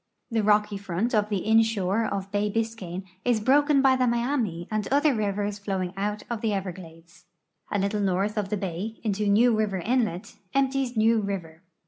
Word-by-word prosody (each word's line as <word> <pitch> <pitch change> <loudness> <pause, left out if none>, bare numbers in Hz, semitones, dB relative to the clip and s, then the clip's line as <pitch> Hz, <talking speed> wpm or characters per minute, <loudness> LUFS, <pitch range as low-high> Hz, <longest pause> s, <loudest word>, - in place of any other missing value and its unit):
The 225 -1 +1
rocky 210 0 +2
front 195 +4 -2
of 210 -1 +2
the 200 -3 -2
inshore 220 -2 +2
of 195 -2 -4
bay 205 +1 0
Biscayne 210 -5 -3 0.2
is 240 -3 +2
bi'oken 275 +4 +3
by 265 -1 +5
the 255 -1 +2
Miami 235 - -1
and 215 -1 -1
other 285 +1 +3
rivers 205 -2 -2
flowing 190 -3 -3
out 210 +2 -2
of 235 -2 -4
the 220 -2 0
Everglades. 170 -3 -7 0.5
A 205 - +1
little 200 +1 0
north 195 +2 0
of 205 -3 -2
the 210 - -1
bay, 195 +3 -4
into 210 -1 -1
New 225 +4 +4
River 215 -3 0
inlet, 220 -1 -1 0.2
empties 270 -3 +1
New 225 +1 +4
river. 175 -5 -5
210 Hz, 175 wpm, -26 LUFS, 195-230 Hz, 0.5 s, by